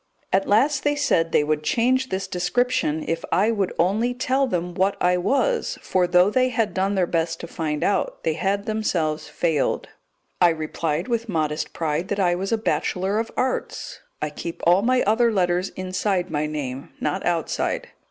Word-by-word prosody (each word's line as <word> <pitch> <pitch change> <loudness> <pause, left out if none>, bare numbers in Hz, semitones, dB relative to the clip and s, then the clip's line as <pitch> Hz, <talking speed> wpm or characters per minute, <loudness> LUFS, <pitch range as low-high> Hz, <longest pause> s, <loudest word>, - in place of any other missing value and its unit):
At 195 +1 +2
last 265 +7 +3
they 290 0 +2
said 220 - +1
they 150 - +4
would 150 0 0
change 255 +10 +1
this 190 +1 -2
description 180 -4 0
if 165 +1 -2
I 210 +4 +3
would 200 -5 0
only 220 +8 +1
tell 265 +2 +1
them 180 -5 -2
what 190 +2 +1
I 180 0 +3
was, 275 - 0
for, 185 -1 +1
though 180 +3 +4
they 255 +2 +3
had 225 -3 0
done 195 +2 0
their 185 -2 +2
best 165 -1 -1
to 170 - -6
find 155 -3 -3
out, 200 - 0
they 160 - +1
had 200 +4 -1
themselves 165 -8 -1
failed. 160 -5 0 0.5
I 175 - +7
replied 160 0 -2
with 235 -2 -2
modest 155 -3 -1
pride 160 +2 -1
that 205 0 -2
I 180 -2 +3
was 190 +4 -3
a 225 - +3
Bachelor 200 -2 0
of 225 - -2
Arts. 255 0 -2 0.2
I 150 - -2
keep 165 +3 -7
all 175 +3 +5
my 250 +3 +2
other 230 +3 +3
letters 180 -2 +1
inside 185 0 -1
my 150 0 0
name, 140 -3 -5
not 190 - -2
outside. 170 -2 -1
185 Hz, 180 wpm, -23 LUFS, 165-225 Hz, 0.5 s, I